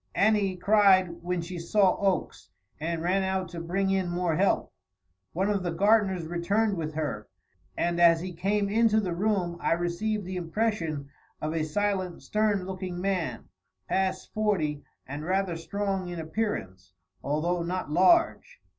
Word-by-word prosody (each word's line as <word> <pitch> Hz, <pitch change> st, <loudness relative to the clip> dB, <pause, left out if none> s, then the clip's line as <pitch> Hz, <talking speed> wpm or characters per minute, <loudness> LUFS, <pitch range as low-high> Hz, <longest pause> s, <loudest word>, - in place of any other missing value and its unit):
Annie 205 Hz, -2 st, +3 dB
cried 185 Hz, -3 st, +4 dB
when 180 Hz, 0 st, -2 dB
she 175 Hz, +1 st, -6 dB
saw 185 Hz, +3 st, +3 dB
Oakes, 195 Hz, -2 st, -1 dB, 0.3 s
and 165 Hz, +1 st, -2 dB
ran 185 Hz, +3 st, +2 dB
out 190 Hz, -2 st, -1 dB
to 170 Hz, 0 st, -7 dB
bring 195 Hz, +3 st, 0 dB
in 190 Hz, -2 st, 0 dB
more 175 Hz, -2 st, 0 dB
help. 190 Hz, +4 st, +1 dB, 0.6 s
One 190 Hz, +4 st, 0 dB
of 205 Hz, -2 st, +1 dB
the 180 Hz, -, -2 dB
gardeners 195 Hz, -1 st, +2 dB
returned 200 Hz, +6 st, 0 dB
with 155 Hz, -3 st, -4 dB
her, 145 Hz, -9 st, -3 dB, 0.5 s
and 175 Hz, 0 st, 0 dB
as 165 Hz, -1 st, +6 dB
he 180 Hz, +1 st, -5 dB
came 200 Hz, +4 st, 0 dB
into 220 Hz, +1 st, +3 dB
the 185 Hz, -5 st, -2 dB
room 180 Hz, -2 st, 0 dB
I -, -, +2 dB
received 175 Hz, +5 st, -1 dB
the 185 Hz, 0 st, -4 dB
impression 165 Hz, -6 st, -2 dB, 0.3 s
of 155 Hz, +1 st, -3 dB
a 160 Hz, -1 st, 0 dB
silent, 185 Hz, +2 st, -1 dB
stern 210 Hz, -3 st, +1 dB
looking 185 Hz, -1 st, -5 dB
man, 185 Hz, -3 st, -2 dB, 0.4 s
past 190 Hz, 0 st, -1 dB
forty 175 Hz, -9 st, 0 dB, 0.2 s
and 145 Hz, +3 st, -6 dB
rather 185 Hz, 0 st, 0 dB
strong 195 Hz, +2 st, -2 dB
in 175 Hz, 0 st, -5 dB
appearance, 130 Hz, -, -4 dB, 0.3 s
although 170 Hz, +5 st, 0 dB
not 175 Hz, -2 st, -3 dB
large. 335 Hz, -, +3 dB
185 Hz, 155 wpm, -27 LUFS, 170-200 Hz, 0.6 s, as